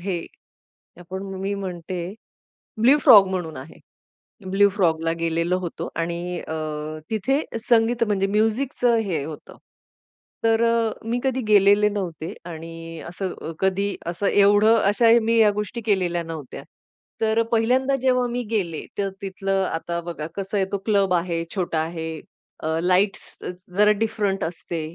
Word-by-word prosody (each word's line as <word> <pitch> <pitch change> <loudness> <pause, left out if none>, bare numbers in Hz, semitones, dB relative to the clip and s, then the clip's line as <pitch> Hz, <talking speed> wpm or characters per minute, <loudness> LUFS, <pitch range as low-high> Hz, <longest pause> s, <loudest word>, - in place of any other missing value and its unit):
हे 175 -2 -3 0.8
आपण 185 +2 -6 0.2
मी 195 +1 -1
म्हणते, 185 -2 -5 0.8
ब्लू 270 +5 +6
फ्रॉग 210 -8 +8
म्हणून 175 -4 -3
आहे. 135 +4 -10 0.7
ब्लू 200 +1 +5
फ्रॉगला 165 -4 +1
गेलेलो 170 +2 0
होतो. 175 -2 -5
आणि 170 +1 -3
अ, 160 - -6 0.6
तिथे 260 +7 +1 0.3
संगीत, 230 0 +3
म्हणजे 195 -2 +1
म्युझिकचं 230 +4 +1
हे 190 -10 -1
होतं. 155 -1 -9 0.9
तर 225 0 +3
अ, 230 -1 +2 0.2
मी 240 +2 0
कधी 260 -1 +1
गेलेले 205 0 +5
नव्हते 180 -6 -4
आणि 165 0 -8
असं 180 +1 -4
अ, - - -5
कधी 195 +1 0
असं 175 +4 -2
एवढं, 205 +2 +5
अशा 210 +4 +4
मी 230 +1 +2
या 215 -2 +6
गोष्टी 210 +3 -4
केलेल्या 180 -5 +1
नव्हत्या. 160 -5 -7 0.6
तर 220 +1 +2
पहिल्यांदा 255 +4 +2
जेव्हा 250 -1 +3
मी 245 +1 -2
गेले, 180 -8 -2
तर 200 -1 0
तिथलं 195 0 -1
आता 170 +1 -3
बघा 160 -3 -5
कसं 195 +1 -3
आहे, 195 - +2
तो 200 - 0
क्लब 200 -4 +2
आहे, 170 -1 0
छोटा 175 -4 -1
आहे, 160 0 -4 0.5
अ, 160 +1 0
लाईट्स 185 +3 +1 0.4
जरा 210 +1 +5
डिफरंट 205 -3 0
असते, 165 0 -5
195 Hz, 140 wpm, -23 LUFS, 170-220 Hz, 0.9 s, फ्रॉग